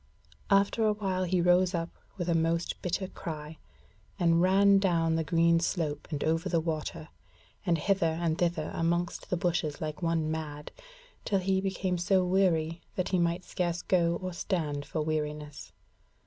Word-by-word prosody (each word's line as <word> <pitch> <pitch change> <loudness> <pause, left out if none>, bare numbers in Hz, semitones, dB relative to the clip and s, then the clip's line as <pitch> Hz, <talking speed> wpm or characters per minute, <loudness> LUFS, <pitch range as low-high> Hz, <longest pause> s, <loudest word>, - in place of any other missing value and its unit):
After 200 +3 +3
a 215 -1 +3
while 190 -3 -1
he 180 0 +1
rose 180 +1 +3
up 165 0 -3 0.3
with 175 -2 -3
a 170 - +2
most 165 +1 0
bitter 180 +2 -1
cry, 155 -4 -7 0.6
and 170 -2 +3
ran 195 +2 +5
down 165 -4 +2
the 160 - 0
green 170 +1 +3
slope 155 -4 -2
and 150 -3 -3
over 165 +1 0
the 170 - +2
water, 160 0 -4 0.6
and 170 -1 +3
hither 165 -2 +1
and 165 -2 +1
thither 170 -2 -1
amongst 170 +1 -1
the 180 - 0
bushes 170 -4 -1
like 155 +2 -5
one 165 -2 0
mad, 150 -2 -5 0.5
till 200 - +1
he 190 0 +1
became 190 -2 -1
so 185 +1 +2
weary 170 -3 +1
that 185 - -1
he 185 - +1
might 170 +1 0
scarce 175 -1 -2
go 170 -2 +2
or 185 -1 -3
stand 155 -5 -2
for 155 - -2
weariness. 150 -1 -4
170 Hz, 165 wpm, -29 LUFS, 160-185 Hz, 0.6 s, ran